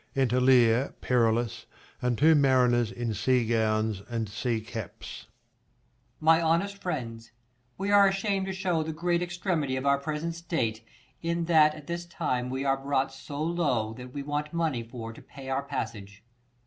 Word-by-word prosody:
Enter 125 -2 +2
Leir, 125 0 +4
Perillus, 115 -2 +1 0.3
and 125 -2 0
two 160 +5 +6
mariners 125 -5 +3
in 120 -2 -3
sea 125 +3 +2
gowns 110 -2 +1
and 115 -2 -2
sea 115 +3 -2
caps. 110 -3 -8
Per. - - -32 1.0
My 160 +1 +6
honest 170 +5 +1
friends, 115 -11 -5 0.5
we 195 +1 -1
are 200 -1 +7
asham'd 195 0 0
to - - -2
shew 185 -4 0
The 160 0 -4
great 170 +2 0
extremity 175 -6 -1
of 130 +1 -3
our 140 0 +3
present 155 +3 -3
state, 160 -10 -2 0.4
In 170 0 -1
that 155 -2 +5
at 155 -2 -11
this 170 +1 -4
time 125 -8 -2
we 130 +2 -3
are 135 0 +2
brought 135 -1 -1
so 145 +2 -6
low, 145 -10 0
That 125 +2 -10
we 140 +1 -5
want 150 +2 -3
money 160 -7 0
for 115 -1 -8
to - - -13
pay 135 -1 -11
our 135 +1 0
passage. 105 -6 -6
135 Hz, 170 wpm, -28 LUFS, 115-165 Hz, 1.0 s, are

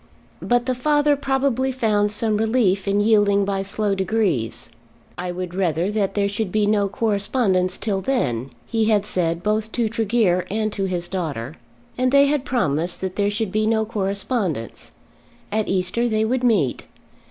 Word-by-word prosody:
But 245 0 +1
the 255 - 0
father 295 +3 +2
probably 270 -2 0
found 210 -5 +1
some 215 0 0
relief 215 -4 +1
in 200 +1 +2
yielding 205 -2 +3
by 195 -1 -1
slow 200 +1 -1
degrees. 190 - -1 0.4
"I 180 0 -4
would 180 0 -5
rather 180 0 0
that 205 -2 -1
there 200 -1 +2
should 205 -1 -3
be 215 +1 +2
no 205 -1 +2
correspondence 200 -3 0
till 200 -3 -2
then," 135 - -1 0.2
he 225 -1 0
had 210 -2 +2
said 170 -4 -1
both 215 +1 0
to 235 -2 +1
Tregear 215 -5 +1
and 215 +1 -1
to 195 - -1
his 175 -2 -2
daughter. 155 -9 -4 0.5
And 255 0 +2
they 280 0 +6
had 285 -1 0
promised 175 - 0
there 190 +2 -1
should 210 -1 -2
be 215 +1 +1
no 220 -1 +2
correspondence. 195 - -2 0.6
At 215 0 0
Easter 190 +6 0
they 220 0 +1
would 250 +2 -1
meet. 205 - +1
205 Hz, 165 wpm, -22 LUFS, 185-225 Hz, 0.6 s, they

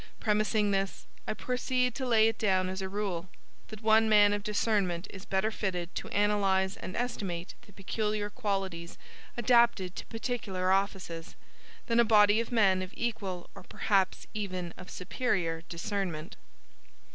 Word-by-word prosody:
Premising 210 -1 +2
this, 195 0 -1 0.2
I 215 - -1
proceed 250 0 0
to 260 +1 -3
lay 220 -2 +5
it 225 0 -1
down 185 -3 +2
as 190 +1 -4
a 190 - -3
rule, 190 -3 -3 0.4
that 215 0 -10
one 220 0 +5
man 205 -1 +6
of 205 - -1
discernment 205 -4 0
is 195 -1 -10
better 195 +3 0
fitted 180 -5 -3
to - - -5
analyze 195 -2 +2
and 185 - -7
estimate 195 -8 -3
the - - -16
peculiar 210 +1 -2
qualities 195 -7 -3 0.4
adapted 235 -6 +3
to - - -5
particular 210 -6 -2
offices, 190 -4 -1 0.5
than 235 0 +2
a - - +8
body 210 -1 +5
of 230 - -3
men 195 -5 +4
of 185 0 -7
equal 200 -7 -3
or - - -11
perhaps 190 +1 0
even 185 -5 -4
of 185 - -11
superior 180 -5 -1
discernment. 175 -1 -3
200 Hz, 150 wpm, -30 LUFS, 185-220 Hz, 0.5 s, a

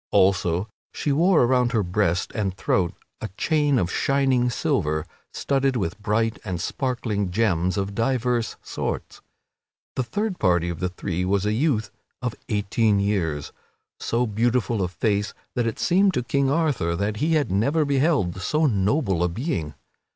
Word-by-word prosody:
Also 95 0 +2 0.2
she 145 - -2
wore 165 +2 +4
around 125 0 +2
her 110 -3 +2
breast 90 -1 0
and 95 -4 -2
throat 90 -3 0 0.3
a 110 - -4
chain 150 -4 +2
of 90 -4 0
shining 135 -3 +2
silver 75 -9 0 0.3
studded 135 -1 0
with 100 -2 -2
bright 110 +1 0
and 95 -5 -3
sparkling 115 - -2
gems 90 -3 +1
of 100 0 -2
divers 120 +1 0
sorts. - - -4 0.7
The - - +1
third 190 - -2
party 90 -3 +2
of 85 - -5
the 90 - -1
three 90 -1 -3
was 100 +2 +1
a 105 - +1
youth 110 -5 0 0.3
of 125 -3 -2 0.2
eighteen 105 0 +1
years, 85 -8 -1 0.5
so 120 +2 0
beautiful 115 -1 0
of 90 - 0
face 100 +3 -1 0.2
that 120 -1 0
it 115 - -3
seemed 190 +1 +3
to 125 - 0
King 140 +2 +1
Arthur 140 - +1
that 105 +4 -1
he 160 +6 +1
had 145 -10 +1
never 140 - +2
beheld 135 - +1
so 155 +10 +1
noble 100 - +1
a 90 - +1
being. 85 - -3
110 Hz, 160 wpm, -24 LUFS, 95-130 Hz, 0.7 s, wore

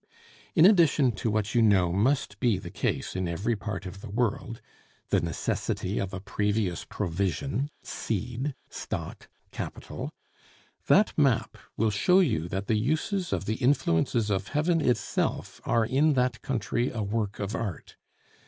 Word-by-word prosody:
In 160 - +7
addition 165 - +5
to 115 - -1
what 110 0 0
you 120 - +4
know 95 -6 +4
must 105 0 +1
be 120 -6 +2
the 90 -2 -8
case - - -2
in 95 -1 -1
every 100 +8 -1
part 100 -1 -5
of 95 +1 -8
the 115 - -8
world 115 +1 -1 0.5
(the - - +3
necessity 85 +3 -2
of 95 -1 -2
a 95 - -5
previous 105 -2 -1
provision, 105 - -2
seed, 125 +6 -3
stock, - - -6 0.2
capital) - - -6 0.8
that - - +4
map - - +2 0.2
will 110 0 +2
show 180 - +4
you 110 - +1
that 95 +3 -3
the 110 +1 +1
uses 160 - -1
of - - -1
the 110 +2 -1
influences 120 - +2
of 95 0 -1
heaven 160 +3 +1
itself 125 -5 -1
are 115 -1 +2
in 140 +6 +3
that 125 -3 +1
country 120 -1 -1
a 110 -3 -3
work 105 0 -2
of 100 +1 -3
art. 100 -10 -4
110 Hz, 155 wpm, -28 LUFS, 100-130 Hz, 0.8 s, In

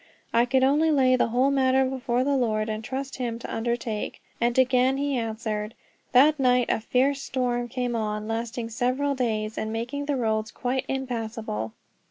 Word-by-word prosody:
I 235 +1 +4
could 260 +1 +2
only 295 +4 +4
lay 260 -4 +4
the 255 - +2
whole 250 +4 +2
matter 265 -1 +3
before 255 -1 0
the 280 +1 +1
Lord, 220 -4 0
and 215 0 -3
trust 270 +3 -4
him 240 -3 -2
to 235 - -6
undertake. 230 -1 -2 0.2
And 235 +1 +1
again 260 +1 +3
he 280 0 0
answered. 220 -2 -3 0.4
That 290 +4 +5
night 250 -2 +3
a - - +1
fierce 265 +5 +1
storm 245 -2 -1
came 245 0 -2
on, 215 -1 -2
lasting 230 +1 -3
several 255 +4 0
days 220 -4 -1
and 220 - -3
making 240 +6 -3
the 290 - +1
roads 220 -2 0
quite 255 +1 -2
impassable. 225 - -3
245 Hz, 175 wpm, -26 LUFS, 225-265 Hz, 0.4 s, That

